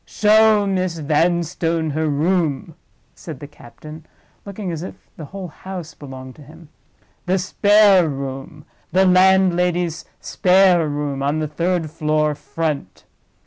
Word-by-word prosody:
"Show 215 0 +3
Miss 185 -3 -1
Vanstone 165 +1 0
her 155 +2 -1
room," 160 0 -1 0.4
said 155 -6 -10
the - - -8
captain, 150 +3 -13 0.4
looking 200 -2 -5
as 160 -2 -5
if 180 - -7 0.2
the 155 - -9
whole 185 +3 -8
house 180 0 -9
belonged 130 -2 -10
to - - -15
him. 155 +2 -16 0.6
"The 185 +1 +2
spare 200 -2 +4
room, 135 +1 -7 0.3
the 190 +1 +3
landlady's 180 -2 +2
spare 180 -4 +3
room, 145 -1 -3
on 140 +2 0
the 155 -1 -2
third 170 +1 -2
floor 155 -1 0
front. 150 - -5
165 Hz, 130 wpm, -20 LUFS, 150-185 Hz, 0.6 s, spare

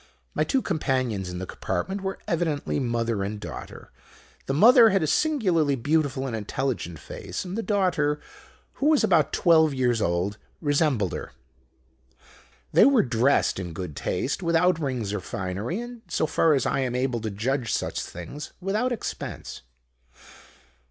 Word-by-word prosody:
My - - +1
two 265 -2 0
companions 130 - -1
in 90 - -5
the 95 - -4
compartment 190 - -3
were 190 0 -3
evidently 160 -4 -1
mother 115 -4 -1
and 105 +2 -4
daughter. - - -9 0.6
The 135 - 0
mother 230 - +8
had 195 -4 +2
a - - +2
singularly 175 - +2
beautiful 140 0 0
and 125 -4 -3
intelligent 110 -5 -3
face; 95 - -6
and 180 +1 -5
the 225 - -1
daughter, 180 -9 +1 0.6
who 285 - +3
was 305 -5 +4
about 170 -9 +3
twelve 160 -4 +4
years 120 -3 +1
old, 90 +4 -1 0.2
resembled 145 - +1
her. - - -6 1.4
They - - +7
were 275 -4 +5
dressed 120 -2 +2
in 90 -3 -5
good 85 -3 -6
taste, 140 - -2
without 170 0 +2
rings 125 -9 -2
or 105 - -1
finery, 100 - -4
and, 240 -1 -8
so 165 - 0
far 155 0 +3
as 135 - 0
I - - +1
am 125 -2 -1
able 125 -2 0
to 110 - -2
judge 115 +4 -1
such - - -1
things, 140 - -8
without 210 +7 0
expense. 240 - -5
140 Hz, 155 wpm, -25 LUFS, 115-180 Hz, 1.4 s, mother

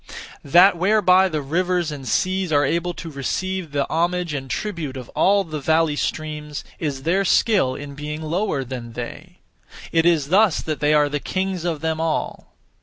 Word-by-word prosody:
That 175 +6 +6
whereby 190 -1 +4
the 155 -3 -3
rivers 175 +2 0
and 135 -3 -7
seas 185 +6 0
are 145 -1 +3
able 170 +4 -1
to 165 - -7
receive 185 +5 -3
the 140 -1 0
homage 175 0 0
and 135 -2 -5
tribute 155 -4 -4
of 125 -2 -8
all 200 +1 +3
the 155 -4 -6
valley 160 +1 +2
streams, 150 -1 -4 0.2
is 140 -4 -3
their 185 +5 +2
skill 190 - +2
in 145 0 -8
being 150 +2 -6
lower 160 -3 -1
than 120 -2 -7
they; 120 0 -8 0.5
it 165 0 +3
is 155 -5 +2
thus 195 -2 +4
that 155 -2 -3
they 150 +1 +3
are 150 -1 +4
the 145 0 -2
kings 185 +1 -3
of 165 -4 -2
them 160 0 -1
all. 165 -1 -3
160 Hz, 180 wpm, -22 LUFS, 145-180 Hz, 0.5 s, That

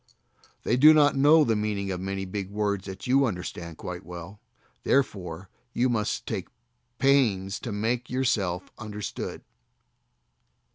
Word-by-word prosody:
They 120 - +1
do 155 +4 +8
not 145 -2 +5
know 150 +3 +6
the 115 -5 +1
meaning 105 -2 -2
of 90 - -3
many 95 0 -3
big 95 0 -5
words 100 -1 -2
that 95 0 -7
you 135 +2 +4
understand 90 -4 -6
quite 90 +1 -6
well, 90 +3 -9 0.4
therefore 95 -9 0 0.3
you 125 +2 +2
must 110 -3 -1
take - - -4 0.5
pains 110 -9 +2
to 120 - -5
make 115 +5 -1
yourself 105 -9 -1
understood. 105 -2 -6
105 Hz, 135 wpm, -27 LUFS, 95-125 Hz, 0.5 s, do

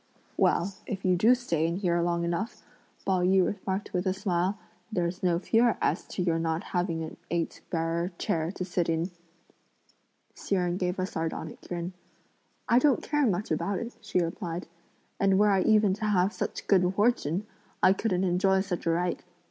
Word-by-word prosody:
"Well, 190 +3 +2
if 195 -2 -4
you 185 -1 +4
do 225 +8 +5
stay 170 -10 0
in 170 - -1
here 175 -3 +1
long 170 0 0
enough," 175 +7 -3 0.4
Pao 190 -2 +2
yü 185 +1 +4
remarked 195 0 -4
with 180 +1 0
a 185 - +1
smile, 190 0 0 0.3
"there's 180 -2 -1
no 175 -2 +2
fear 230 +5 +3
as - - 0
to 180 - -3
your 165 -2 +1
not 165 +1 -1
having 175 -3 0
an 160 - -7
eight 170 -1 -2
bearer 170 +2 -1
chair 160 +1 -1
to 185 - -4
sit 175 -2 -1
in!" 165 +3 0 1.2
Hsi 200 - -2
Jen 180 -1 0
gave 180 0 -1
a 185 - 0
sardonic 160 -3 -4
grin. 175 +1 -4 0.7
"I 240 - +5
don't 280 -1 +3
care 295 -3 +2
much 195 0 -1
about 200 -1 0
it," 235 +4 -5
she - - -2
replied; 170 0 -3 0.5
"and 195 -1 +4
were 210 +1 +5
I 195 -1 +3
even 210 -2 +4
to 215 +2 -3
have 195 -1 +2
such - - -4
good 185 -2 +4
fortune, 205 -4 +1 0.4
I 185 - +7
couldn't 190 -2 0
enjoy 190 +1 +3
such 185 -3 -4
a - - +4
right. 175 +2 0
180 Hz, 180 wpm, -28 LUFS, 170-200 Hz, 1.2 s, I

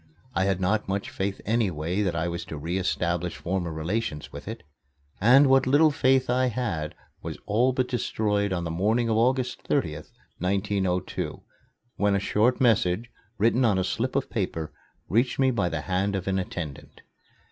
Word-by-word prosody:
I 95 - +1
had 95 -2 +1
not 100 +3 0
much 100 +1 -2
faith 95 0 -3
anyway 95 -5 0
that 95 -5 0
I 85 +1 0
was 85 0 -3
to 80 - -7
re 85 +6 -2
establish 90 -2 -1
former 90 -2 -2
relations 80 0 -3
with - - -9
it, - - -6 0.6
and 125 +7 +7
what 135 -1 +4
little 150 +4 +5
faith 130 -2 +3
I 125 +1 +2
had 100 -11 -2 0.3
was - - -6
all 120 +5 +3
but 130 0 0
destroyed 105 -4 0
on 90 -2 -1
the 80 - -3
morning 110 +7 +1
of 110 - +2
August 125 +1 +1
30th, - - -1 0.3
1902, 95 -1 -1 0.5
when 100 -1 +2
a - - +2
short 110 +5 +2
message, 115 -2 +2 0.3
written 115 +5 +3
on 110 -5 +3
a 95 - +1
slip - - -2
of - - -1
paper, 80 -2 -3 0.3
reached 120 +6 +1
me 135 -1 +3
by 100 -7 0
the 80 -2 -3
hand 95 +5 0
of 95 -1 -4
an 95 0 +1
attendant. 85 -6 -6
100 Hz, 175 wpm, -26 LUFS, 90-120 Hz, 0.6 s, and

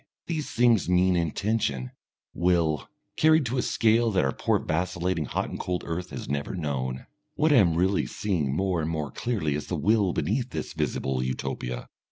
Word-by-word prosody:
These 160 -3 -3
things 115 -5 +3
mean 90 0 +4
intention, 85 - -1 0.4
will, 85 -6 +1 0.3
carried 155 -2 +5
to 125 +2 -1
a - - +3
scale 115 0 +3
that 95 -8 +2
our 65 - +1
poor - - +1
vacillating, 85 0 -1
hot - - -2
and - - -5
cold 90 -1 -2
earth 90 +2 -4
has - - -7
never 70 +6 -2
known. 65 -6 -3 0.3
What 155 0 +3
I - - +6
am 85 -7 +4
really 95 +3 +2
seeing 85 -10 -1
more 90 +3 0
and 80 - -2
more 75 -3 -3
clearly 100 -12 -1
is 75 - -4
the 90 - -2
will 100 +4 +2
beneath 115 - -1
this - - -5
visible 65 -1 -1
Utopia. 65 -1 -3
90 Hz, 180 wpm, -27 LUFS, 75-110 Hz, 0.4 s, I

